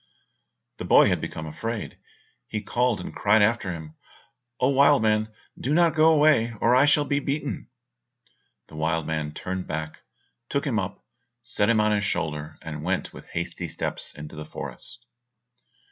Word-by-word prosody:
The - - -5
boy - - +6
had - - 0
become 80 - -5
afraid; 110 +8 -5 0.5
he 110 - -3
called 120 +1 0
and 90 - -7
cried 105 +1 +4
after 105 -3 +1
him, 80 -2 -8 0.7
"Oh, 130 - +3
wild 140 -2 +5
man, 110 0 +2 0.3
do 140 +4 0
not 170 -2 +4
go 155 0 +5
away, 145 -7 +4
or 120 +2 +4
I 135 +3 +5
shall 145 0 +4
be 140 0 +1
beaten!" 145 +1 -3 1.0
The 80 - -14
wild 80 +1 0
man 80 -2 -2
turned 95 +4 -5
back, 80 0 -5 0.5
took - - -1
him - - +1
up, - - -5 0.4
set 110 -3 0
him 115 -2 +4
on 105 0 +3
his 105 -1 +1
shoulder, 80 -5 -3
and 75 -2 -6
went 90 +2 -2
with - - -12
hasty - - -4
steps - - -4
into 75 +1 -9
the 75 - -6
forest. 115 +8 -7
105 Hz, 165 wpm, -25 LUFS, 80-125 Hz, 1.0 s, boy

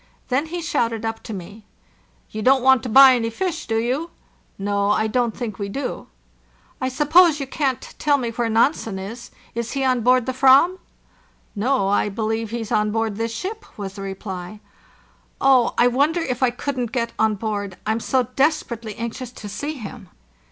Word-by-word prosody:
Then 275 +5 +1
he 345 +1 -5
shouted 230 -9 -1
up 225 0 -3
to 230 - -9
me: 200 +2 -8 0.7
"You 215 - -5
don't 260 +2 +4
want 265 -2 +5
to 255 - -5
buy 265 +3 +9
any 230 -2 0
fish, 350 +9 -3
do 225 - 0
you 255 +9 -1 0.3
?" - - -38
"No, 200 0 0
I 215 +1 +2
don't 235 +1 0
think 220 -5 -5
we 200 -1 -3
do." 265 +5 -4 0.7
"T 260 - 0
suppose 305 +4 +4
you 275 - -3
can't 270 -2 -2
tell 290 -1 +3
me 240 -4 -3
where 235 0 -1
Nansen 225 -2 +1
is? 215 +5 -7 0.2
Is 235 0 -4
he 275 - -1
on 255 -2 +2
board 250 +1 +3
the 260 0 -3
Aram 275 +8 +6
2" - - -32 0.8
"No, 230 0 +1
I 205 +1 +2
believe 220 +2 -2
he's 230 -1 -5
on 210 0 +2
board 225 -2 -1
this 230 0 -2
ship," 410 - -5
was 195 -2 -5
the 195 - -9
reply. 190 0 -6 0.8
"Oh, 260 -3 +4
I 240 - +5
wonder 285 +7 +2
if 255 -6 -3
I 255 - +4
couldn't 250 -1 -3
get 235 -3 -2
on 220 -1 +3
board? 205 -2 -4
I'm 220 +1 0
so 255 +2 +1
desperately 240 -7 0
anxious 235 +2 -5
to 210 - -9
see 285 +10 -4
him." 220 - -9
235 Hz, 190 wpm, -22 LUFS, 215-265 Hz, 0.8 s, buy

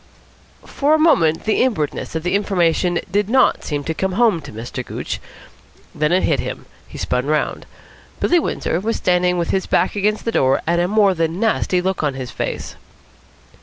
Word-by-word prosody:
For 290 +2 +1
a - - +3
moment 165 - +3
the 215 - +1
inwardness 180 - -1
of 160 - -2
the 180 - -1
information 180 -3 +1
did 205 +1 +1
not 260 +2 +3
seem 145 -2 -3
to 160 - -2
come 190 +3 -2
home 215 -5 +2
to 140 - -10
Mr. 120 +3 -6
Gooch. - - -5 0.7
Then 150 +1 0
it 185 +1 +3
hit 145 -5 +2
him. - - -5 0.2
He - - -11
spun 125 +2 -1
round. 155 0 -1 0.5
Billy 350 - +3
Windsor 170 - -2
was 225 +4 -1
standing 180 0 +1
with 170 -1 -1
his 190 - -1
back - - +1
against 210 +1 0
the 230 - 0
door 135 -9 +2
and 170 +1 +1
a 175 - +1
more 205 -1 +3
than 165 0 -1
nasty 205 -5 +1
look 190 0 -1
on 145 -3 -1
his 130 -3 -6
face. - - -4
180 Hz, 190 wpm, -19 LUFS, 155-210 Hz, 0.7 s, a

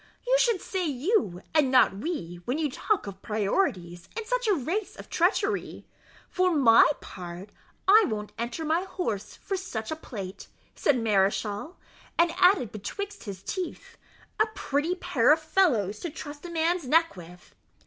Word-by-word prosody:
"You - - +3
should 470 -6 +3
say 380 -1 -3
you, 285 - 0
and 300 -4 +4
not 255 -7 +5
we, 200 - -4
when 250 +4 -1
you 305 -3 -1
talk 425 +9 0
of 195 -1 -8
priorities 195 - -1
in 455 - -3
such - - -1
a 410 - +4
race 350 - -3
of - - -12
treachery; 400 +4 0 0.4
for 365 -2 +1
my 235 -6 +7
part, 180 +2 -9 0.4
I 425 +2 +7
won't 210 -2 -4
enter 235 +7 -3
my 320 +3 +2
horse 355 - -4
for 390 - -4
such 250 - -5
a - - -1
plate," 200 -11 -8 0.3
said 285 - +2
Mareschal; 210 - 0 0.4
and 340 0 +4
added 360 - +4
betwixit 400 - -6
his 195 -2 -7
teeth, 370 - -6 0.4
"A 435 - +4
pretty 295 +6 -1
pair 300 -9 +2
of 315 - +5
fellows 285 - +1
to 345 - -4
trust 290 0 -9
a - - -8
man's 335 -2 0
neck 330 +1 +3
with!" 175 0 -13
295 Hz, 160 wpm, -27 LUFS, -, 0.4 s, my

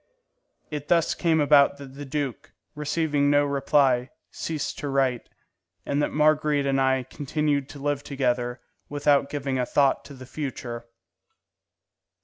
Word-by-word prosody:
It 150 -1 -5
thus 170 -2 +3
came 165 -2 +1
about 145 -1 +5
that 135 -2 -11
the 145 +1 -8
duke, 140 -2 -4 0.2
receiving 150 -1 0
no 145 0 +4
reply, 135 -3 +2 0.2
ceased 155 -3 -4
to 145 - -3
write, 135 -3 0 0.6
and 140 +1 0
that - - +1
Marguerite 150 -1 +2
and 135 -1 +1
I 130 -1 +2
continued 145 +1 -2
to 145 - -10
live 145 0 -1
together 125 -3 -1 0.3
without 145 -1 +2
giving 135 -3 -2
a 125 - +1
thought 140 -2 +2
to 140 - -11
the 130 0 -11
future. 120 -4 -6
140 Hz, 140 wpm, -25 LUFS, 135-150 Hz, 0.6 s, about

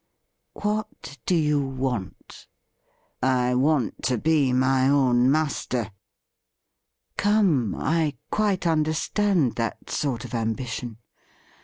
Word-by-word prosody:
' - - -54
What 210 -9 -3
do 180 - +3
you 150 -3 +2
want 130 -7 -5 0.3
?' - - -44
' - - -46
I 125 -1 +2
want 135 0 +1
to 125 -1 +1
be 145 0 +2
my 130 +1 +3
own 130 -3 +3
master.' 135 -7 -1 0.7
' 65 +1 -55
Come, 190 - +2
I 155 -1 0 0.2
quite 205 -4 0
understand 160 - +1
that 115 -1 -4
sort 130 -5 -2
of 125 - -10
ambition. 115 0 -3
135 Hz, 120 wpm, -24 LUFS, 125-160 Hz, 0.7 s, do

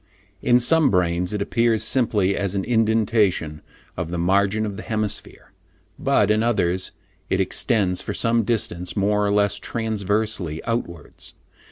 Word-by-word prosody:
"In 120 0 +4
some 155 +4 +3
brains 90 -1 0
it 105 -1 -1
appears 115 0 +1
simply 105 -7 +1
as 100 -1 -2
an 95 - -1
indentation 110 -8 +1 0.3
of - - -4
the 90 - -3
margin 100 +4 +1
of 100 -2 -5
the 110 - -7
hemisphere, 110 -2 -4 0.5
but, 105 0 +2
in 110 +1 +2
others, 95 -6 0 0.4
it - - 0
extends 95 -6 +1
for - - -5
some 115 0 +2
distance 95 -6 -2
more 105 +1 +1
or 100 - +1
less 100 0 +1
transversely 105 -6 -2
outwards. 85 -9 -5
105 Hz, 145 wpm, -22 LUFS, 90-110 Hz, 0.5 s, In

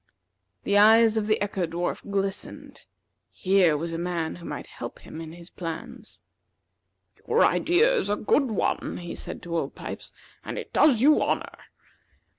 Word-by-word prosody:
The 200 0 +3
eyes 220 +1 +6
of 215 -1 0
the 215 - +2
Echo 195 -3 -2
dwarf 170 +2 -3
glistened. 195 -1 -4 0.4
Here 185 -5 +2
was 165 +2 -4
a 165 - -3
man 170 -2 -3
who 170 - -12
might - - -6
help - - -8
him 160 - -10
in 160 0 -8
his 170 +1 -12
plans. 210 +9 -7 1.1
"Your - - +4
idea 455 +9 +3
is 430 - 0
a 205 - +2
good 265 +5 +1
one," 215 - -1
he 175 -1 -7
said - - -7
to 170 -1 -4
Old 145 -4 -2
Pipes, - - -7 0.3
"and - - -6
it - - -7
does 260 -6 +4
you 300 +2 +5
honor. - - -1
195 Hz, 165 wpm, -26 LUFS, 170-225 Hz, 1.1 s, eyes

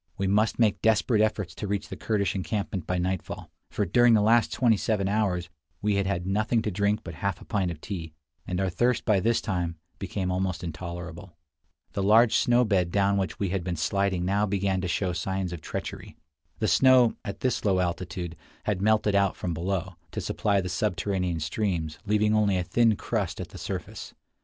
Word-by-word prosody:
We 95 - -1
must 105 +3 +2
make 110 -4 +2
desperate 110 0 +3
efforts 105 -5 0
to 105 - -5
reach 100 0 -2
the - - -5
Kurdish 100 -5 0
encampment 95 0 -3
by 90 - 0
nightfall; 90 0 -3 0.2
for 105 - -1
during 120 +5 +5
the 105 - +4
last 115 +2 +4
twenty 120 -3 +3
seven 100 -1 0
hours 95 -4 0 0.3
we 105 -1 +1
had 100 -1 0
had 95 -3 -1
nothing 110 +4 +1
to 105 - -1
drink 100 +3 +1
but 85 - -7
half 100 +2 -2
a - - -13
pint 95 -4 0
of 85 -3 -6
tea, 85 -6 -5 0.4
and 90 0 -2
our 95 -1 0
thirst 120 +7 +1
by 105 -4 +3
this 115 +4 +1
time 90 -4 -2 0.2
became 95 -1 -2
almost 90 -1 -1
intolerable. 85 +1 -7 0.6
The 100 - -1
large 110 +3 +5
snow 125 -2 +4
bed 95 -5 +2
down 100 +2 +2
which 95 -1 -2
we 100 - -1
had 95 -1 -2
been 90 -1 -2
sliding 95 +2 0
now 100 +3 +1
began 95 -1 0
to 90 - -2
show 90 0 -1
signs 95 +1 -2
of 85 - -7
treachery. - - -6 0.4
The 110 - 0
snow, 125 +4 +5
at 100 -1 -6
this 130 -2 0
low 95 -3 +2
altitude, 85 -1 -3 0.3
had 100 -3 -1
melted 110 0 +3
out 100 -1 +2
from 90 - -3
below, 90 +1 -3 0.2
to - - -2
supply 100 -2 0
the 90 - -4
subterranean 90 -2 -1
streams, 80 -2 -2
leaving 105 +1 +3
only 105 -3 +3
a 90 - 0
thin 115 +3 +3
crust - - -2
at - - -5
the - - -10
surface. - - -6
100 Hz, 200 wpm, -27 LUFS, 90-105 Hz, 0.6 s, during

